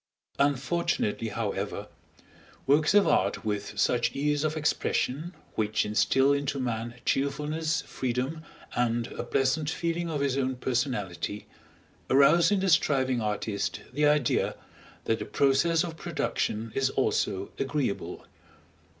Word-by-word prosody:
Unfortunately, 140 -5 0
however, 105 -1 -3 0.8
works 150 +7 +3
of 205 - +6
art 100 +3 +1
with 105 -1 -3
such 120 -1 +2
ease 145 +1 +1
of 155 0 -1
expression, 155 +1 -1 0.2
which 110 -1 0
instil 135 +6 +3
into 140 0 -1
man 120 -1 -3
cheerfulness, 150 +4 0
freedom, 130 +5 -3 0.3
and 120 -1 +1
a - - -4
pleasant 145 +3 +1
feeling 170 +1 -2
of 150 -3 -2
his 140 -1 +1
own 130 -1 0
personality, 120 -7 -2 0.6
arouse 140 +6 +6
in 205 -2 +2
the 195 - +1
striving 130 -6 +2
artist 105 -1 -2
the 150 +2 +3
idea 145 -4 +2 0.5
that 110 0 0
the - - -4
process 150 +5 +2
of 165 -2 -6
production 110 -6 -2
is 135 -1 +1
also 100 -7 0
agreeable. 135 -6 -2
135 Hz, 125 wpm, -28 LUFS, 115-150 Hz, 0.8 s, of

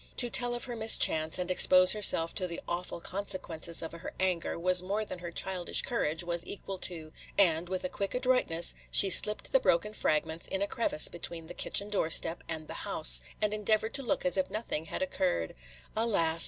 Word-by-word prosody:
To 240 -1 +2
tell 245 -1 +2
of 240 - -6
her 245 -2 -6
mischance, 160 -8 +3
and 180 0 -4
expose 185 0 +5
herself 180 -6 +2
to 185 - -3
the 170 - -7
awful 175 0 -5
consequences 170 -4 -4
of 165 - -7
her 170 +2 -10
anger, 185 -3 -2
was 180 +1 +4
more 200 +4 -3
than 185 - -9
her 175 0 -8
childish 180 +1 -2
courage 165 -9 -2
was 170 0 -3
equal 195 -1 -8
to; 160 -4 -1 0.2
and, 175 -3 +3
with 185 -1 -4
a - - -1
quick 195 +3 -5
adroitness, 250 -10 +3 0.2
she 195 - +7
slipped 210 +3 +6
the 270 - +3
broken 210 -2 0
fragments 160 -3 -2
in 190 +1 -3
a - - -2
crevice 205 -8 +1
between 170 -1 -6
the 175 - -10
kitchen 200 +3 -2
doorstep 165 -3 +1
and 160 -1 -5
the - - -8
house, - - +5 0.2
and 210 0 0
endeavored 215 +1 -1
to 275 - 0
look 245 - -2
as 180 +1 +1
if 190 - -1
nothing 215 -8 -4
had 280 - -4
occurred. 185 - -3 0.4
Alas! 170 -8 0
185 Hz, 195 wpm, -29 LUFS, 165-210 Hz, 0.4 s, she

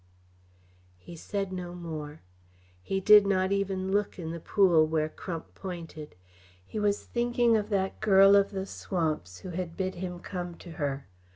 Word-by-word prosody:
He 170 - -12
said 195 +3 -4
no 180 -1 -5
more. 155 -3 -7 0.6
He 195 - -2
did 205 +1 +7
not 190 -1 +1
even 195 -1 -1
look 205 +1 0
in 165 -3 -5
the 170 - -5
pool 170 -4 +4
where 155 -1 0
Crump 165 +1 -7
pointed. 165 - -8 0.5
He 215 - -5
was 205 -1 +1
thinking 240 -1 +2
of 210 -1 0
that 195 -2 -1
girl 195 -2 +6
of 200 0 +4
the 195 -1 -4
swamps 155 - -3
who 185 - -7
had 175 -1 -5
bid 185 -1 -1
him 180 0 -5
come 175 -2 -5
to 170 - -12
her. 140 -1 -2
185 Hz, 165 wpm, -29 LUFS, 165-200 Hz, 0.6 s, did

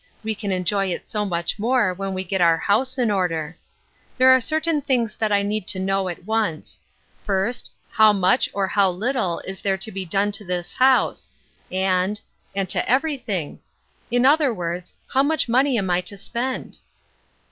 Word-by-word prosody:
We 220 0 -1
can 205 -1 -4
enjoy 190 +2 0
it 180 - -4
so 210 -2 -2
much 175 +1 -2
more 230 -3 +2
when 195 +1 -4
we 185 - -2
get 190 0 -2
our 165 -1 +5
house 255 +9 +1
in 240 -4 +1
order. 165 -5 -1 0.6
There 260 0 +6
are 260 0 +6
certain 315 +2 +1
things 245 -5 0
that 220 -2 0
I 200 0 +3
need 205 -1 -2
to 185 - 0
know 195 0 0
at 175 0 -8
once. 215 -7 -2 0.4
First, 200 +4 -1 0.2
how 220 -1 +6
much 200 +5 +2
or 200 -1 0
how 195 0 +3
little 195 -1 -1
is 190 0 -7
there 195 -1 0
to 205 +3 -1
be 195 -1 -4
done 200 +4 +1
to 205 +1 -5
this 180 -2 -3
house, 260 0 +2 0.4
and 190 +2 0 0.2
— - - -37
and 195 -1 -1
to - - +1
every 285 +5 +2
thing? 185 -11 -4 0.5
In 245 +1 +2
other 290 -1 +4
words, 175 -3 -5
how 265 - +3
much 310 +1 +2
money 255 +2 +2
am 190 -3 -1
I 175 +1 +2
to 200 +2 -5
spend?" 250 +6 -4
200 Hz, 190 wpm, -22 LUFS, 185-245 Hz, 0.6 s, There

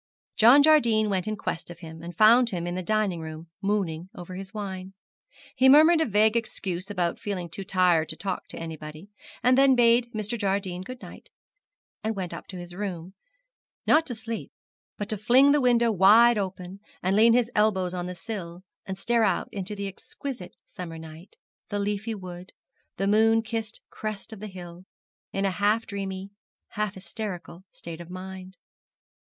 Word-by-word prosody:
John 245 +6 +7
Jardine 235 -9 +4
went 190 -1 -1
in 215 - -1
quest 175 -2 -4
of 175 0 -11
him, 160 -1 -9
and 170 0 -9
found 235 +3 +6
him 175 -4 -3
in 175 - -3
the 185 - -3
dining 200 -3 0
room, 160 +1 -8
mooning 190 -4 -1
over 175 +1 -8
his 190 +1 -7
wine. 195 -3 -6 0.6
He 265 +1 +5
murmured 315 +4 +7
a 320 - +1
vague 215 +1 +3
excuse 195 -5 -3
about 180 -4 -1
feeling 185 -4 -4
too 195 +4 -4
tired 180 -4 +2
to - - -4
talk 190 -2 -4
to - - -8
anybody, 160 +3 -8 0.3
and 250 +1 +5
then 270 0 +5
bade 235 0 +4
Mr. 220 +1 -3
Jardine 195 -3 -1
good 255 +6 -9
night, - - -12 0.7
and 220 0 -1
went 185 -3 -4
up - - -8
to 185 - -7
his 175 0 -9
room; 185 -2 -5 0.7
not 320 +1 +4
to 245 - -4
sleep, 225 +1 -6 0.5
but 205 - -4
to 215 - -1
fling 255 +7 +5
the 295 0 +3
window 235 -2 +3
wide 220 +5 +6
open, 190 -1 -5 0.2
and 185 +2 +2
lean 225 +2 +6
his 240 -1 +2
elbows 190 -4 +2
on 180 -1 -3
the 180 - -6
sill, 180 -4 -7 0.2
and 190 -1 -4
stare 230 +3 +1
out - - +1
into 200 +1 -4
the 200 0 -4
exquisite 210 +1 -8
summer 165 -3 -8
night, 160 +2 -12 0.3
the 205 - -2
leafy 205 +2 -2
wood, 180 -2 -9 0.4
the 195 - 0
moon 225 +2 +4
kissed 225 0 -5
crest 215 0 -6
of 215 - -10
the 215 - -6
hill, 175 -2 -10 0.5
in 195 0 -1
a 195 - +1
half 210 +4 +1
dreamy, 195 -1 -5 0.4
half 210 -1 -3
hysterical 190 -2 -7
state 170 0 -9
of 170 - -11
mind. 185 +1 -8
195 Hz, 180 wpm, -26 LUFS, 180-220 Hz, 0.7 s, John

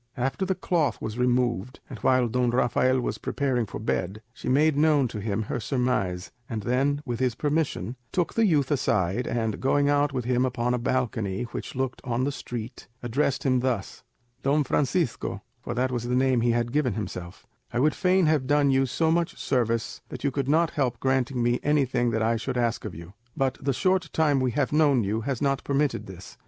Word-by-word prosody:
After 135 +10 -1
the 190 - +1
cloth 165 - 0
was 110 +2 -5
removed, 125 -2 0
and - - -9
while 130 -2 +3
Don 125 +1 +1
Rafael 130 +1 +2
was 125 - -3
preparing 125 -5 -1
for - - -6
bed, 105 -1 -2
she - - -5
made 150 +3 +4
known 150 -3 +3
to 110 - -5
him 105 +1 -1
her 115 - -3
surmise, 115 -8 -1 0.2
and 110 -3 -3
then, 140 +5 +1
with 120 -3 -3
his 125 -3 +1
permission, 145 -4 -1 0.2
took 175 -3 0
the 225 -1 +3
youth 150 -5 +2
aside, 115 -5 +1
and, 110 -3 -1
going 140 +2 +2
out 145 0 +2
with 125 -3 -3
him 125 0 +2
upon 125 -1 0
a 125 - 0
balcony 115 -5 -1
which - - -6
looked 130 0 -2
on 125 0 -1
the 140 - 0
street, 120 -3 -7 0.2
addressed 130 +3 0
him 130 -2 +2
thus:— 120 -6 -2 0.4
"Don 145 +2 +2
Francisco," 135 - -1 0.2
for 120 - -5
that 130 +1 0
was 120 -2 -2
the 125 +1 0
name 130 -2 +3
he 120 - +2
had 120 0 +1
given 130 -5 +1
himself, 90 -4 -6 0.3
"I 120 - -1
would 150 +4 +3
fain 185 -1 +3
have 150 -4 +2
done 145 -1 +3
you 135 0 +3
so 160 +5 +1
much 170 +1 0
service 115 -3 -1
that - - -8
you 140 - +1
could 135 0 -2
not 160 +2 +3
help 125 -5 -1
granting 130 -2 0
me 120 +1 +2
anything 130 -5 +1
that 110 -1 0
I 115 +1 +2
should 125 +3 -3
ask 120 -2 0
of 105 - -6
you; 85 +3 -10 0.2
but 135 -2 0
the 140 0 0
short 185 +5 +1
time 150 -4 +3
we 130 -1 +1
have 145 -1 0
known 145 -6 +4
you 105 +3 -1
has 135 +2 -2
not 140 -1 +1
permitted 140 0 0
this. 95 -1 -11
130 Hz, 205 wpm, -26 LUFS, 120-145 Hz, 0.4 s, made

